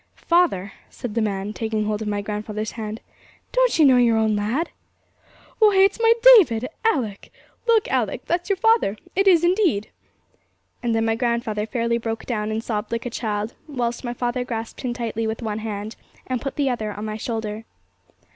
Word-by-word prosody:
'Father!' 335 - +1 0.2
said 240 -4 -7
the 230 - 0
man, 200 -1 -2
taking 220 -1 -2
hold 210 0 -2
of 215 - -4
my 205 -1 -2
grandfather's 210 +1 -4
hand, 220 -1 -6 0.5
'don't - - +2
you 315 - +6
know 260 -2 +6
your 235 -2 +4
own 220 -1 +2
lad?' 225 +11 -1 0.9
'Why, 425 -3 +5
it's 390 +3 +4
my 455 0 +5 0.3
David! 245 - 0 0.2
Alick, 245 - -1 0.4
look 455 -2 +4
Alick, - - -1
that's 350 +2 -1
your 395 - +3
father; 445 - +3 0.2
it 390 +1 +2
is 345 -3 +6
indeed!' 345 - +2 0.9
And 235 -2 0
then 225 0 +1
my 225 - +2
grandfather 230 -2 -1
fairly 235 -1 0
broke 225 -1 -4
down, 215 -3 -2
and 220 +1 -2
sobbed 210 -2 -3
like 230 +1 -3
a 245 - -3
child, 215 -1 -3
whilst 245 -5 -3
my 240 -1 -4
father 245 +1 -1
grasped 230 -2 -5
him 245 -2 -3
tightly 225 -2 -2
with 220 +2 -4
one 215 -1 -2
hand, 215 0 -5 0.3
and 255 -2 -2
put 275 - -4
the 285 -2 0
other 220 -3 -3
on 210 +1 -6
my 215 0 -4
shoulder. 220 -1 -4
230 Hz, 185 wpm, -23 LUFS, 215-265 Hz, 0.9 s, you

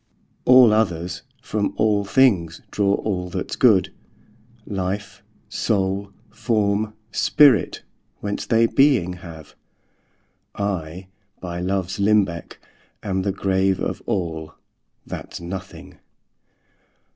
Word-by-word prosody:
All 125 -3 +7
others, 90 -4 -1 0.2
from 105 -1 -2
all 105 -2 +2
things, 100 -8 +2
draw 100 -1 +1
all 90 -4 -3
that's - - -4
good, - - +4 0.7
Life, 95 +1 -4 0.3
soule, 100 -1 -1 0.2
forme, 110 -2 0 0.2
spirit, 130 - +4 0.4
whence 100 0 -4
they 115 0 +4
beeing 125 -8 +3
have; 80 -3 -11 1.0
I, 95 -3 -3 0.3
by 85 -1 -5
loves 95 +1 -2
limbecke, 100 -4 +1 0.5
am 95 -2 -1
the 100 +1 0
grave 95 -1 +1
Of - - -3
all, 80 -4 -3 0.5
that's - - -7
nothing. 90 +2 -8
95 Hz, 100 wpm, -22 LUFS, 90-105 Hz, 1.0 s, All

